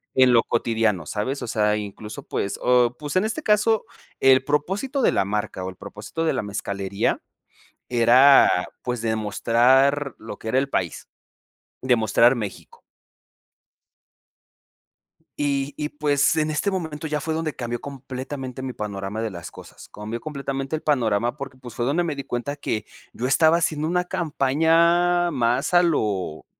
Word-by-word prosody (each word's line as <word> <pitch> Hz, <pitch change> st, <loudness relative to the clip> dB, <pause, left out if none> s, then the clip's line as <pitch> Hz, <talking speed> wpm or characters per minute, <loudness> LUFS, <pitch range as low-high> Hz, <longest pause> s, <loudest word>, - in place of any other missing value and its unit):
en 130 Hz, -1 st, +5 dB
lo 115 Hz, -, +6 dB
cotidiano 110 Hz, -7 st, 0 dB
¿Sabes? 110 Hz, -, -3 dB
O -, -, -5 dB
sea, 105 Hz, -2 st, +1 dB
incluso, 105 Hz, +1 st, -7 dB
pues, 100 Hz, -, -2 dB
o, 125 Hz, -1 st, +3 dB
pues, 145 Hz, 0 st, -6 dB
en 185 Hz, -, +3 dB
este 225 Hz, +8 st, -3 dB
caso 215 Hz, 0 st, +2 dB, 0.3 s
el 130 Hz, 0 st, +5 dB
propósito 195 Hz, -, -1 dB
de -, -, +4 dB
la -, -, +1 dB
marca, 105 Hz, -1 st, -3 dB
o, 95 Hz, -, -3 dB
el 95 Hz, -, -10 dB
propósito 110 Hz, -, -6 dB
de 160 Hz, -, +2 dB
la 130 Hz, -, -1 dB
mezcalería 100 Hz, -1 st, -2 dB, 0.7 s
era, 125 Hz, +3 st, +6 dB, 0.3 s
pues, 125 Hz, -2 st, -3 dB
demostrar 120 Hz, +6 st, +2 dB
lo 110 Hz, -2 st, -8 dB
que 110 Hz, -, -6 dB
era 130 Hz, -, +3 dB
el 140 Hz, -, -1 dB
país, 90 Hz, -, -3 dB, 0.8 s
demostrar 120 Hz, -1 st, +4 dB
México. 105 Hz, -6 st, -7 dB, 2.6 s
Y 140 Hz, -1 st, -1 dB
y 150 Hz, 0 st, -3 dB
pues, 145 Hz, -1 st, +1 dB
en 155 Hz, -1 st, +1 dB
este 155 Hz, +7 st, 0 dB
momento 160 Hz, -4 st, -4 dB
ya 150 Hz, -1 st, -2 dB
fue 160 Hz, +3 st, -2 dB
donde 160 Hz, -1 st, -2 dB
cambió 120 Hz, -1 st, -4 dB
completamente 135 Hz, -1 st, -7 dB
mi 130 Hz, -1 st, -4 dB
panorama 105 Hz, -1 st, -5 dB
de 110 Hz, -1 st, -2 dB
las 85 Hz, -3 st, -8 dB
cosas, -, -, -13 dB
cambió 110 Hz, +3 st, -5 dB
completamente 135 Hz, -1 st, -4 dB
el 155 Hz, -, -8 dB
panorama 120 Hz, -4 st, +1 dB
porque, 135 Hz, -2 st, -8 dB
pues, 120 Hz, -3 st, -11 dB
fue 120 Hz, -, -2 dB
donde 155 Hz, +7 st, +1 dB
me 160 Hz, -3 st, -2 dB
di 140 Hz, -, -5 dB
cuenta, 130 Hz, +3 st, -4 dB
que 110 Hz, -7 st, -3 dB, 0.3 s
yo 125 Hz, -, -3 dB
estaba 160 Hz, +5 st, +4 dB
haciendo 155 Hz, -2 st, -1 dB
una 180 Hz, +2 st, 0 dB
campaña 170 Hz, +3 st, +2 dB
más 130 Hz, +3 st, 0 dB
a 175 Hz, -, +7 dB
lo 100 Hz, -, -1 dB
130 Hz, 160 wpm, -23 LUFS, 110-150 Hz, 2.6 s, a